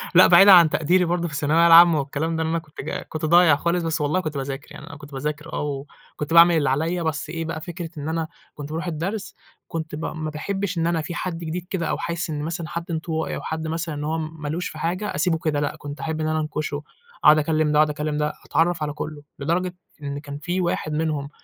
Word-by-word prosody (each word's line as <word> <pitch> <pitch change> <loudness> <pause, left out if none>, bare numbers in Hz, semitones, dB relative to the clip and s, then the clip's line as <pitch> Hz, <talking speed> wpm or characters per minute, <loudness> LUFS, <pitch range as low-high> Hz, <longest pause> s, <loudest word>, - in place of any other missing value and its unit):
لأ 180 - +9
بعيدًا 195 +3 +8
عن 170 -4 +8
تقديري 175 +5 +2
برضو 175 0 0
في 155 - -9
الثانوية 155 +4 +3
العامة، 170 -1 +8
والكلام 145 +4 -2
ده، 160 - 0
لأن 160 - -1
أنا 165 - +1
كُنت 155 -2 -10
جا - - -4
كُنت 155 0 -5
ضايع 170 -1 +6
خالص 170 +4 0
بس 165 -1 -1
والله 150 +5 +1
كُنت 155 -5 -4
باذاكر 135 +1 -5
يعني - - -10
أنا - - -9
كُنت 145 0 -13
باذاكر 150 +3 -4
آه، 140 -2 -3 0.3
وكُنت 150 +2 -4
باعمل 170 0 +8
اللي 145 -4 +2
عليَّ 165 +6 0
بس 155 -1 -2
إيه 165 0 -4
بقى 160 -1 -4
فكرة 170 0 -6
إن 145 +1 -4
أنا، 160 0 -1 0.3
كُنت 145 -1 -7
باروح 165 +3 -4
الدرس، 180 +6 -4 0.3
كُنت 160 -2 -5
ب 155 - -5
ما 155 -1 -4
باحبش 195 +5 -3
إن 165 0 +1
أنا 170 -1 +1
في 160 +3 -6
حد 180 -2 -3
جديد 170 +1 -4
كده 175 -4 -2
أو - - 0
حاسس 170 0 -3
إن 150 -2 -3
مثلًا 165 +1 -4
حد 170 +2 -4
انطوائي 160 0 -2
أو - - -5
حد 160 0 -4
مثلًا 165 0 -3
إن 145 - -4
هو 155 +2 -1
م 160 0 -6
ما 150 - -4
لوش 170 +4 -2
في - - -10
حاجة، 180 +6 -2
أسيبه 175 -4 +1
كده 155 -2 -1
لأ 145 0 -2
كُنت 145 0 -8
أحب 160 +2 -3
إن 155 - 0
أنا 155 0 0
أنكشه، 155 -1 -3 0.4
أقعد 155 - +8
أكلّم 155 0 +1
ده، 150 - +3
وأقعد 155 0 +5
أكلّم 150 0 -2
ده 150 0 0
أتعرّف 165 +1 +1
على 150 -1 -2
كلّه، 150 0 -6 0.2
لدرجة 175 +5 -1 0.3
إن 140 0 -4
كان 145 -1 -8
في 175 +5 -2
واحد 170 -3 -1
منهم، 150 -2 -1
160 Hz, 245 wpm, -23 LUFS, 150-170 Hz, 0.4 s, لأ